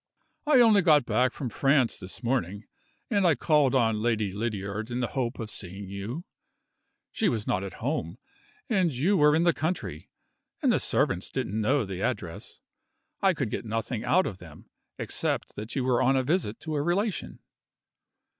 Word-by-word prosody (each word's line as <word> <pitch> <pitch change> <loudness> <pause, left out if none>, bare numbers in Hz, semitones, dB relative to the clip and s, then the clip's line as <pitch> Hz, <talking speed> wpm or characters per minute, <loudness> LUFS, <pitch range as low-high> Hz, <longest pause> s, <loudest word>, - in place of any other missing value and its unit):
"I 280 -5 +6
only 220 -4 +6
got 150 -6 +5
back 125 +1 +2
from 130 -1 -5
France 135 0 +2
this 95 +5 -10
morning, 105 -5 -1 0.5
and 200 -4 +3
I 165 - +4
called 145 -4 +3
on 115 -4 +2
Lady 110 -4 0
Lydiard 105 0 -3
in 120 0 -3
the 120 - -1
hope 125 -2 -1
of 110 -3 -5
seeing 95 +1 -7
you. 105 - -5 0.9
She 215 - +1
was 110 -8 -2
not 95 - 0
at 95 - -6
home 85 +6 -2 0.5
and 190 -8 +2
you 155 +11 +1
were 150 -3 +5
in 165 - +3
the 170 -1 +4
country 155 - -3 0.5
and - - +3
the - - +2
servants - - 0
didn't 110 +3 -2
know 130 +3 +2
the 95 -1 -6
address. 95 - -4 0.6
I 190 -3 +3
could 130 -8 -2
get - - -3
nothing 115 +1 -3
out 185 +7 +3
of 95 - -5
them, 80 -4 -14 0.3
except - - -2
that 105 +2 -6
you 135 - 0
were 125 -1 +2
on 135 +2 +3
a 130 - +2
visit 145 - -1
to 160 0 -4
a 145 - 0
relation." 185 +5 -1
125 Hz, 180 wpm, -27 LUFS, 105-155 Hz, 0.9 s, I